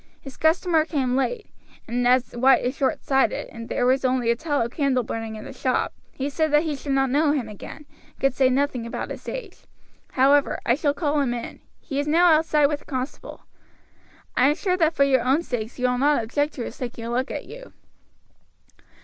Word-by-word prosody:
His 270 -2 -11
customer 320 0 +2
came 270 -6 -1
late, 430 - -1 0.4
and 245 +1 0
as 250 0 +3
White 255 +2 +4
is 255 +2 -1
short 275 -3 -1
sighted, 270 -1 +1
and 230 0 -9
there 245 - 0
was 260 +2 +2
only 255 -2 +2
a - - +1
tallow 285 -3 -1
candle 260 -1 0
burning 225 0 -5
in 215 - -9
the - - -8
shop, 255 0 -1 0.2
he 270 - -4
said 310 +2 0
that 295 +1 +5
he 310 -3 -2
should 275 0 -4
not 270 -1 +2
know 295 +1 +3
him 265 -6 -2
again, 215 +8 -10
and - - -29
could 270 -1 +2
say 260 -1 +3
nothing 255 -3 0
about - - -5
his - - -7
age; 455 -7 -7 0.6
however, 275 +2 +3
I 240 - +4
shall 290 +1 0
call 295 -2 0
him 245 -3 0
in; 235 - -7 0.2
he 280 -3 -4
is 290 - -2
now 340 +3 +5
outside 310 -1 +3
with 290 0 0
the - - -21
constable. 260 -1 -6 0.9
I 255 - +4
am 295 - +1
sure 365 +1 0
that 330 -2 +1
for 280 - +4
your 265 -2 +3
own 270 +7 +2
sakes 235 -6 -4
you 250 - -1
will 250 0 0
not 285 -3 +3
object 290 +6 -1
to 245 - -4
his - - -9
taking 240 -2 -6
a 235 - -4
look 255 +3 -1
at - - -5
you." - - -11
270 Hz, 215 wpm, -24 LUFS, 250-300 Hz, 0.9 s, that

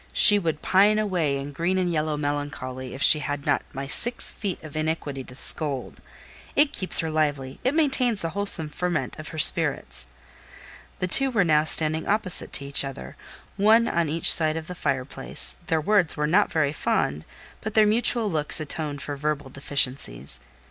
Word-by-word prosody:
She 205 -1 +7
would 160 -5 -4
pine 205 +3 +3
away 180 -9 -1
in 140 +1 -7
green 170 +6 -2
and 180 -2 -1
yellow 155 -1 -2
melancholy 145 -3 -5
if 135 - -4
she 155 - +7
had 145 -1 -5
not - - 0
my 135 +1 -7
six 235 - -2
feet 195 -6 -6
of 155 -1 -11
iniquity 155 -3 -4
to 125 - -13
scold. 140 -1 +3 0.5
It 290 0 +2
keeps 185 - +5
her 160 -1 -4
lively—it 145 - -2
maintains 260 -8 +1
the 165 - -2
wholesome 195 -5 -1
ferment 175 0 -4
of 155 - -9
her 160 - -10
spirits." 65 - +2 0.9
The 180 - -3
two 270 +9 +6
were 225 -6 +1
now 155 -3 +1
standing 155 0 +3
opposite 200 -3 0
to 140 - +3
each 140 +1 +2
other, 130 - -9 0.4
one 220 +3 +3
on 170 -6 -1
each 165 +2 +6
side 155 -1 +1
the 180 - -8
fire 140 -6 -3
place; 135 0 -5
their 160 - 0
words 185 0 +2
were 150 - -1
not 185 +7 +1
very 150 -3 -1
fond, 75 - -2 0.4
but 215 0 -7
their 215 -1 +5
mutual 225 +1 0
looks 150 -1 +1
atoned 150 -1 -4
for 145 - -6
verbal 145 -1 -4
deficiencies. 125 - -3
155 Hz, 175 wpm, -23 LUFS, 145-190 Hz, 0.9 s, She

